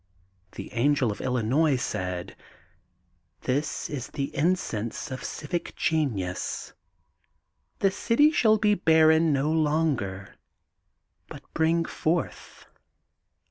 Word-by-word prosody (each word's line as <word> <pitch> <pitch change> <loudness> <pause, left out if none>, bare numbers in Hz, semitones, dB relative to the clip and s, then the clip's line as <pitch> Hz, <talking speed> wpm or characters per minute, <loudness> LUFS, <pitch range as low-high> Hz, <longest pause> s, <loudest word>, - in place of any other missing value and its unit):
The - - -8
Angel 130 0 +2
of 100 - -7
Illinois 130 +5 +1
said: 90 -7 -4 0.5
— - - -45
*This 140 +4 -2
is 135 -4 -5
the 140 -1 -5
Incense 140 - -1
of 130 - -6
Civic 170 +3 -4
Genius. 115 - -2 1.0
The 195 - +2
city 270 +9 +3
shall 220 -7 +4
be 210 -1 +3
barren 160 -3 +4
no 140 +2 +1
longer 145 - 0 0.9
but - - -10
bring 165 +1 +2
forth. 165 -2 -3
150 Hz, 100 wpm, -26 LUFS, 120-165 Hz, 1.0 s, shall